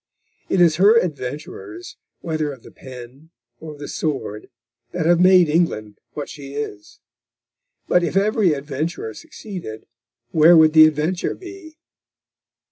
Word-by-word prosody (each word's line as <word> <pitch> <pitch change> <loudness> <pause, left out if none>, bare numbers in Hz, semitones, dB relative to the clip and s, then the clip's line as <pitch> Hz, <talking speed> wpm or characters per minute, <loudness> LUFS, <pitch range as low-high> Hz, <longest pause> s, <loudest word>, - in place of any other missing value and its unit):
It 190 - +2
is 165 -3 +4
her 205 +5 +5
adventurers, 180 - -5 0.3
whether 155 -3 -2
of 130 -4 -12
the - - -14
pen 130 +4 -12 0.3
or 155 -1 -9
of - - -14
the 145 - -7
sword, 135 -9 -4 0.4
that 175 -3 -2
have 170 0 +4
made 180 -1 +6
England 130 -11 -1
what 145 - -5
she 140 -2 -10
is. 105 -8 -7 0.9
But 180 - +3
if 170 +3 -1
every 205 - +2
adventurer 145 -3 -4
succeeded, 165 - -9 0.5
where 165 +2 +6
would 155 -1 +5
the 155 -1 +9
adventure 155 +4 -2
be? 360 -4 -12
155 Hz, 135 wpm, -21 LUFS, 140-180 Hz, 0.9 s, the